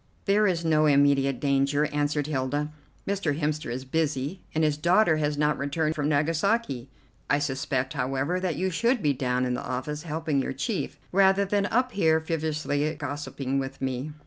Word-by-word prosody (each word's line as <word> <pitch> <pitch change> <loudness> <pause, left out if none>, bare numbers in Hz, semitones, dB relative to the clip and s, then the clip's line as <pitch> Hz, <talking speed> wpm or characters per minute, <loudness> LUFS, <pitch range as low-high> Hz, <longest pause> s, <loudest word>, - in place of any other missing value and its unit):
"There 210 +1 +4
is 170 -3 0
no 155 -1 +4
immediate 140 -2 +3
danger," 140 +1 +2
answered 145 0 0
Hilda. 145 +1 -1 0.4
"Mr. 175 -7 -1
Hemster 150 -2 -1
is 130 +2 -4
busy, 150 +3 -1
and 160 - +2
his 150 -1 +2
daughter 170 +2 +3
has 150 -1 -1
not 150 0 +1
returned 155 +3 0
from 150 -1 -1
Nagasaki; 155 - 0 0.4
I - - +4
suspect, 135 -2 -1
however, 135 +7 -1
that 185 -1 -1
you 190 0 -1
should 235 +6 +1
be 145 -2 +3
down 125 -1 0
in 125 - -1
the 125 - -2
office 130 +4 -4
helping 155 -3 -1
your 135 - -3
chief, 195 - -3
rather 195 +1 +4
than 200 +1 +1
up 250 +3 +1
here 160 -6 +3
frivolously 155 -2 -1
gossiping 145 -2 -3
with 135 0 -5
me." 135 +3 -3
150 Hz, 170 wpm, -26 LUFS, 140-165 Hz, 0.4 s, There